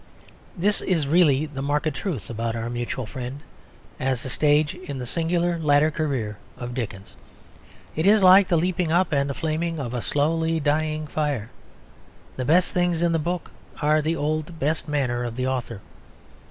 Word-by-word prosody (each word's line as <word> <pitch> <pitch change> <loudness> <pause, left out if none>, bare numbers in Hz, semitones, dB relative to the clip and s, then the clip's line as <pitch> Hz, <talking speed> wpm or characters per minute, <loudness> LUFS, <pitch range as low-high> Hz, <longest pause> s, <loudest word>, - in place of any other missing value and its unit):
This 200 +4 +2
is 165 -6 +1
really 150 -2 +4
the 145 -3 -6
marked 150 +2 0
truth 140 - -4
about 115 0 -2
Our 115 +1 -3
Mutual 120 +1 -3
Friend, 125 +4 -6 0.6
as 130 +1 -1
a 130 - -4
stage 150 +1 +3
in 180 -7 -7
the 125 - -4
singular 170 +4 0
latter 150 0 +3
career 135 -10 -2 0.2
of 120 0 -6
Dickens. 100 -6 -6 0.8
It 160 +4 +1
is 210 -1 +5
like 190 +1 +8
the 170 - +2
leaping 175 0 0
up 175 0 +2
and 140 -1 +1
flaming 165 +1 -2
of 125 -3 -4
a 120 - -2
slowly 160 +4 +1
dying 155 +1 0
fire. 145 -7 -2 0.8
The 130 - -3
best 175 +5 +3
things 175 -2 +1
in 170 - +3
the 165 - +1
book 175 +2 -3 0.3
are 150 +1 +3
in 155 - 0
the 160 +2 0
old 155 +2 -2
best 155 +3 -1
manner 130 -5 0
of 120 -1 -4
the 130 +1 -2
author. 125 -5 -3
150 Hz, 175 wpm, -24 LUFS, 130-165 Hz, 0.8 s, like